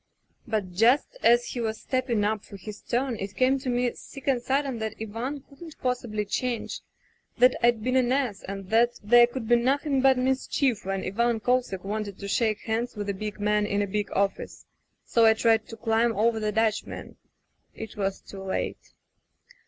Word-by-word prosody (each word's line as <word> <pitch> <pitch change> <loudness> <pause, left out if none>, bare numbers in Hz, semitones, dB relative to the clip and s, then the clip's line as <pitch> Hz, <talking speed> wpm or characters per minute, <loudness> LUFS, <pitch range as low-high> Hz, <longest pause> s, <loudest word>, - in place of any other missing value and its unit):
"But 210 -5 -2
just 235 - +3
as 240 +1 +5
he 245 - -4
was 220 -1 -2
stepping 250 -5 0
up 210 0 0
for 200 - -11
his 205 +2 -9
turn 250 -1 -1
it 195 0 -5
came 260 +3 +3
to 260 -1 -4
me 245 0 +1
sick 275 - -12
and 260 -3 +2
sudden 270 -1 -1
that 220 0 -3
Ivan 230 +6 -4
couldn't 310 +2 -12
possibly 240 -4 -2
change; 240 +3 -2 0.6
that 250 +1 +5
Fd 235 -2 +3
been 255 +2 0
an 250 -1 +3
ass, 255 -7 0
and 195 0 -7
that 235 +2 +4
there 240 +3 +7
could 240 -2 -6
be 240 +1 +5
nothing 275 +3 +1
but 265 -1 +5
mischief 255 -3 0
when 195 0 -2
Ivan 235 +4 0
Kosek 245 -6 0
wanted 205 -1 -4
to 200 - -7
shake 215 +1 +1
hands 230 +2 -2
with 205 -1 -4
a - - 0
big 210 +2 -6
man 210 0 +1
in 205 0 0
a - - 0
big 205 +1 -3
office. 200 0 -2 0.4
So 230 -1 +4
I 220 - +6
tried 225 -1 +2
to 225 - -9
climb 225 0 +1
over 225 +1 +2
the 215 -1 -1
Dutchman 220 0 -2 0.3
— - - -36
^it 220 -1 -7
was 195 -2 -2
too 195 - -10
late. 190 0 -4
225 Hz, 190 wpm, -26 LUFS, 210-250 Hz, 0.6 s, there